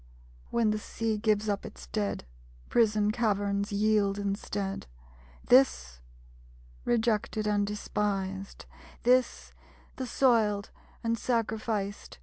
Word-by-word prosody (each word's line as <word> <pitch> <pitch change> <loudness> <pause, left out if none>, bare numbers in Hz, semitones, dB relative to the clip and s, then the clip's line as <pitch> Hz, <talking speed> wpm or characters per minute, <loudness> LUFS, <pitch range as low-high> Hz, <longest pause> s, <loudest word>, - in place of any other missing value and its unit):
_When 230 -2 +2
the 215 - -1
Sea 220 0 -2
gives 215 -1 +1
up 200 -1 -1
its - - -10
dead, 205 - -2 0.4
Prison 215 -2 +3
caverns, 205 -3 0
yield 205 -1 +2
instead 200 - -3 0.6
This, 245 - +4 0.9
rejected 220 -2 +1
and 205 -1 +1
despised; 195 -2 -3 0.4
This, 250 +1 +2 0.4
the 260 - -3
Soiled 220 -6 +2 0.3
and 230 -1 0
Sacrificed! 220 -3 -2
210 Hz, 100 wpm, -29 LUFS, 200-230 Hz, 0.9 s, This